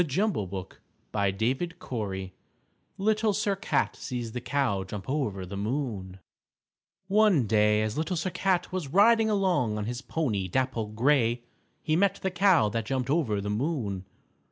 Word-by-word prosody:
LITTLE 165 - 0
SIR 100 - -3
CAT 95 - -4 0.7
Little 215 +1 +2
Sir 205 0 0
Cat 200 +4 0
Sees 120 -3 -5
the 125 - -4
Cow 125 -8 0
Jump 95 +1 -7
Over 110 -10 -2
the 95 +2 -7
Moon 105 -4 -3 0.9
One 200 - +4
day 105 0 +3
as 110 +6 -2
Little 165 +3 -1
Sir 185 +3 -1
Cat 180 +1 0
was 185 -5 -3
riding 220 +7 +5
along 180 - +1
on 105 - -2
his 120 +2 -4
pony, 110 -14 -1
Dapple 120 +1 -1
Gray, 120 +1 +2 0.4
he 155 0 +1
met 195 +2 +3
the 190 - 0
Cow 180 - +4
that 110 0 -3
jumped 130 0 -1
over 135 -11 +1
the 105 +1 -3
moon. 110 - -2
130 Hz, 150 wpm, -28 LUFS, 105-180 Hz, 0.9 s, riding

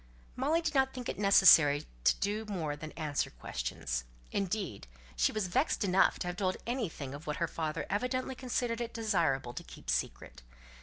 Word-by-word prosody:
Molly 300 +6 +1
did 320 -2 -1
not 265 -1 +2
think 250 -2 -5
it - - -4
necessary 165 -7 +7 0.2
to - - +5
do 210 +2 -1
more 170 -8 -3
than 155 +1 -8
answer 150 -3 -1
questions; - - -4 0.3
indeed, 190 - -2 0.3
she - - +2
was 215 -2 -1
vexed 255 - +1
enough 190 -1 +4
to - - -4
have 180 0 -4
told 185 -2 0
anything 205 - -3
of 145 +2 -9
what 150 - -2
her 170 - 0
father 155 -2 -3
evidently 250 +5 -1
considered 245 -2 -2
it 235 -1 -5
desirable 170 - 0
to - - -6
keep - - -6
secret. 65 +1 -3
195 Hz, 175 wpm, -32 LUFS, 150-235 Hz, 0.3 s, necessary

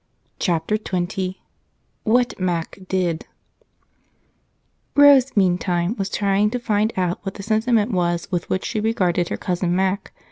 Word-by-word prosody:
Chapter 175 +4 0
20 185 -1 -3 0.7
WHAT 245 +2 +2
MAC 175 -1 -2
DID 175 -4 -1 1.7
Rose, 280 -4 +6
meantime, 180 0 +1
was 195 -3 -3
trying 200 +1 +1
to 250 - -2
find 215 -2 0
out 180 -1 0
what 195 -2 -6
the 200 - -8
sentiment 220 +1 +1
was 175 -2 0
with 175 -1 -2
which 190 - -1
she 220 - -2
regarded 185 -6 0
her - - -3
cousin 180 -1 -1
Mac. 190 +2 -1
190 Hz, 135 wpm, -22 LUFS, 180-215 Hz, 1.7 s, Rose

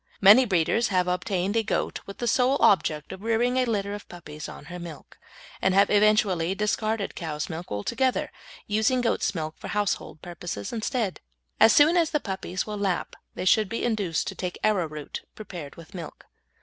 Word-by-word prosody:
Many 210 +6 +8
breeders 200 +3 +2
have 180 -2 +1
obtained 185 +2 -1
a 225 - +4
goat 220 - -2
with 200 - -8
the 240 - -3
sole 255 +4 +3
object 155 -5 +2
of 190 - -8
rearing 230 +3 +1
a 255 - +3
litter 205 -4 -1
of 205 - -8
puppies 155 -3 -9
on - - -10
her 175 +3 -8
milk, 165 -5 -10 0.4
and 190 0 +2
have 200 - +5
eventually 205 -4 +3
discarded 215 0 -1
cow's 155 -2 -4
milk 165 +2 -7
altogether, 250 - 0 0.3
using 220 +4 +2
goat's 230 -4 0
milk 155 -1 -3
for - - -7
household 205 -6 -2
purposes 175 - -6
instead. 220 -3 -2 0.4
As 225 - +8
soon 310 +8 +6
as 330 -2 +3
the 300 - 0
puppies 190 -4 -4
will 210 -1 -5
lap 190 -4 -1 0.2
they - - -4
should 210 +1 +4
be 230 - -3
induced 205 -9 0
to - - -6
take 180 -1 -5
arrowroot 165 -8 -1
prepared 175 -9 -8
with 165 -2 -14
milk. 170 -4 -9
195 Hz, 180 wpm, -26 LUFS, 175-220 Hz, 0.4 s, Many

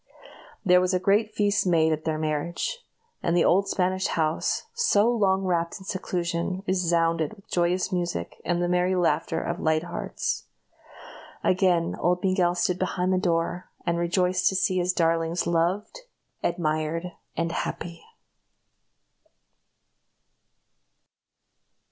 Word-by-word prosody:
There 180 -1 +6
was 185 0 +1
a - - +2
great 210 +3 +2
feast 205 -2 +2
made 160 -2 +3
at 155 0 -5
their 155 -1 0
marriage; 155 - -2 0.4
and 170 +1 +1
the 170 - +4
old 195 +2 +3
Spanish 185 0 0
house, 160 -1 0
so 350 - +3
long 195 -5 +2
wrapped 170 -2 0
in 190 - -13
seclusion, 180 -1 -2
resounded 170 -3 +1
with 195 - -21
joyous 180 +2 +1
music 175 -1 -3
and 175 0 0
the - - +1
merry 180 +1 +2
laughter 170 -2 +1
of 170 +1 -3
light 155 0 +1
hearts. 175 - -3 1.0
Again 180 -3 +2
old 180 +1 +1
Miguel 185 -2 +2
stood 180 +1 0
behind 185 0 0
the 185 - +2
door, 175 -1 -1 0.2
and 170 -1 0
rejoiced 180 +1 +2
to 190 - -3
see 185 0 +1
his 180 +1 +1
darlings 165 0 +1
loved, 175 - 0 0.4
admired, 165 +1 -1 0.3
and 165 0 0
happy. 170 0 -4
175 Hz, 130 wpm, -26 LUFS, 170-185 Hz, 1.0 s, There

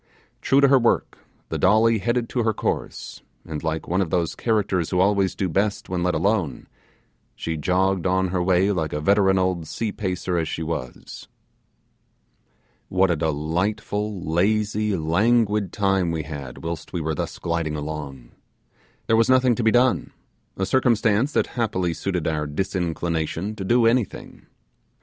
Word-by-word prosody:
True 135 +1 +3
to 140 - +6
her 135 -1 +5
work, 120 - 0 0.3
the - - -3
Dolly 110 +3 +4
headed 120 +2 0
to 125 - -1
her 110 -2 0
course, - - -4 0.2
and 80 -1 -6
like 80 0 -2
one 90 +3 +1
of 90 - -1
those 85 -1 0
characters 100 -7 0
who 90 - 0
always 100 0 +2
do 95 - -1
best 100 +5 -1
when 90 -1 -2
let 90 0 +1
alone, 95 - 0 0.7
she 80 - -3
jogged 90 +4 +1
on 95 0 +1
her 90 0 -1
way 95 +2 +3
like 80 -6 -2
a 75 - -1
veteran 95 +4 +3
old 90 -3 0
sea 110 +5 -3
pacer 90 -3 -2
as 80 - -1
she 80 - -4
was. 75 -6 -6 1.6
What 95 0 +3
a - - +2
delightful, 90 +7 -2
lazy, 105 +4 +1
languid 105 +4 +2
time 95 -3 +1
we 80 -2 -2
had 70 -4 -8
whilst 80 -1 -5
we 90 - -1
were 80 0 -2
thus - - -4
gliding 85 -2 -2
along! 75 -5 -6 0.7
There 110 - +3
was 115 +1 +3
nothing 130 -1 +4
to 120 - -2
be 110 - +4
done; 125 +2 +2 0.4
a 95 - 0
circumstance 115 +1 +2
that - - +2
happily 95 -8 -1
suited 90 -1 -2
our 75 -2 -1
disinclination 85 +2 -2
to 100 - -5
do 120 +4 +3
anything. 115 -2 -1
95 Hz, 160 wpm, -23 LUFS, 80-105 Hz, 1.6 s, to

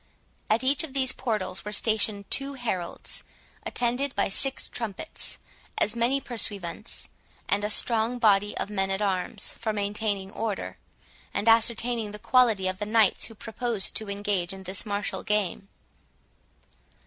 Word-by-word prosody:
At 220 +4 +3
each 280 +6 +3
of 305 -5 -6
these 265 -2 +3
portals 215 -7 -2
were 210 - -5
stationed 215 -2 +1
two 275 0 -1
heralds, 215 -9 -2 0.4
attended 250 +3 0
by 200 - +2
six 270 +7 +2
trumpets, 230 +5 -4 0.4
as 215 - +2
many 240 +4 +2
pursuivants, 210 -6 -3 0.4
and 205 +1 +2
a 210 - 0
strong 230 +2 +2
body 205 -3 +3
of 205 - -3
men 195 -2 0
at 195 +2 0
arms 190 -3 -1
for 225 -1 0
maintaining 205 -1 -1
order, 215 -2 -3 0.6
and 210 - -1
ascertaining 230 -1 +3
the - - -5
quality 225 -4 +4
of 185 0 -2
the 210 - -2
knights 220 -2 +4
who 225 - -11
proposed 225 0 -1
to 215 -2 -5
engage 200 -3 -1
in 190 0 -9
this 190 +4 -3
martial 205 0 -1
game. 210 -2 -1
215 Hz, 150 wpm, -27 LUFS, 200-235 Hz, 0.6 s, quality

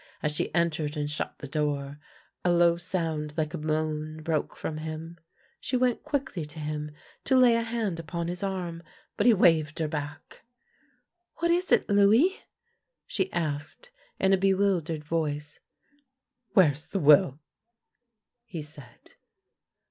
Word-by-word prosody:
As 150 - +1
she 150 - -2
entered 160 -3 0
and 145 0 -1
shut 150 +1 -4
the 140 - -8
door, 145 -1 -2 0.4
a 175 - +3
low 170 -1 +5
sound 165 -4 -3
like 155 -1 -1
a - - -2
moan 155 0 -2
broke 155 -2 -1
from 155 - -4
him. 160 +2 -6 0.4
She 255 - -1
went 250 -1 +1
quickly 265 - -2
to 150 +1 -10
him 150 0 -3 0.4
to 265 - +4
lay 250 -2 +6
a 230 - +2
hand 225 -6 -2
upon 165 +1 -4
his 175 +1 -4
arm, 180 -4 -3 0.3
but 210 - +2
he 240 - +8
waved 160 -5 +3
her 160 - 0
back. 150 -1 -6 0.4
" 355 0 -44
What 340 0 +1
is 355 +2 +1
it, - - +4
Louis? 215 - +4 0.3
" - - -44 0.3
she 190 -2 -2
asked, 155 - -4 0.3
in 190 0 +3
a - - +5
bewildered 190 -5 +1
voice. 150 -2 -2 0.5
" 260 -2 -50
Where 185 -8 +7
is 145 +2 -10
the - - -3
will? 145 -3 +6 0.6
" 240 -1 -53 0.3
he 165 -9 -6
said. 145 -5 -13
165 Hz, 160 wpm, -28 LUFS, 150-200 Hz, 0.6 s, he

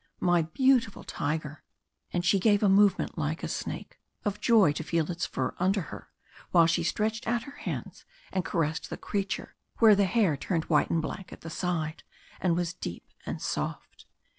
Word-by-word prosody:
My 175 -1 +3
beautiful 240 - +2
tiger!" 155 0 -3 0.5
And 175 0 -1
she 195 +2 +4
gave 205 +1 +3
a - - +5
movement 195 -3 +3
like 155 +1 -2
a - - -1
snake, - - -5 0.3
of 205 0 -2
joy 215 -10 +5
to 155 - -4
feel 165 +1 0
its 170 0 -2
fur 130 -1 -2
under 190 +2 +2
her, - - -9 0.4
while 170 -2 +6
she 170 +1 +2
stretched 220 +7 -1
out 235 0 +1
her 280 - -9
hands - - -5 0.3
and 185 - 0
caressed 160 -1 -1
the - - -5
creature 200 -1 -3 0.2
where 225 -2 +7
the 200 0 +4
hair 190 -5 +2
turned 165 +2 -2
white 150 -3 +2
and 165 -1 +1
black 185 +3 -6
at - - -11
the 165 - -7
side, 165 -3 -2 0.4
and 175 -3 +2
was 175 0 -1
deep 90 - -7
and - - -4
soft. - - -4
180 Hz, 185 wpm, -28 LUFS, 160-205 Hz, 0.5 s, where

